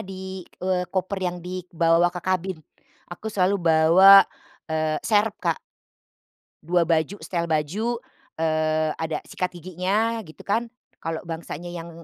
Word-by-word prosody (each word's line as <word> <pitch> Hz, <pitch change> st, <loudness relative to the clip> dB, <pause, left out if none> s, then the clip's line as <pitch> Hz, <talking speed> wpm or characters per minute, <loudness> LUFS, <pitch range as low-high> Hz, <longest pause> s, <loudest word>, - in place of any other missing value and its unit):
di, 190 Hz, 0 st, -7 dB, 0.2 s
eee, 185 Hz, -1 st, +1 dB
koper 190 Hz, +1 st, -2 dB
yang 180 Hz, -1 st, -2 dB
dibawa 175 Hz, -1 st, +2 dB
ke 175 Hz, 0 st, -7 dB
kabin, 185 Hz, -2 st, -1 dB, 0.5 s
aku 220 Hz, -, -6 dB
selalu 200 Hz, -1 st, +2 dB
bawa, 170 Hz, +4 st, +8 dB, 0.5 s
eee, 155 Hz, -1 st, 0 dB
serep 215 Hz, -1 st, +2 dB
Kak -, -, -1 dB, 1.0 s
2 175 Hz, +2 st, +2 dB
baju 165 Hz, +3 st, +1 dB
setel 170 Hz, -2 st, -2 dB
baju, 185 Hz, +10 st, -1 dB, 0.4 s
eee, 155 Hz, -1 st, +1 dB
ada 160 Hz, -1 st, -2 dB
sikat 180 Hz, -1 st, -3 dB
giginya, 185 Hz, +6 st, -1 dB
gitu 155 Hz, -, -13 dB
kan, 225 Hz, +4 st, 0 dB, 0.3 s
kalau 165 Hz, -1 st, -4 dB
bangsanya, 170 Hz, 0 st, -6 dB
yang, 170 Hz, -1 st, -7 dB
180 Hz, 130 wpm, -24 LUFS, 160-190 Hz, 1.0 s, bawa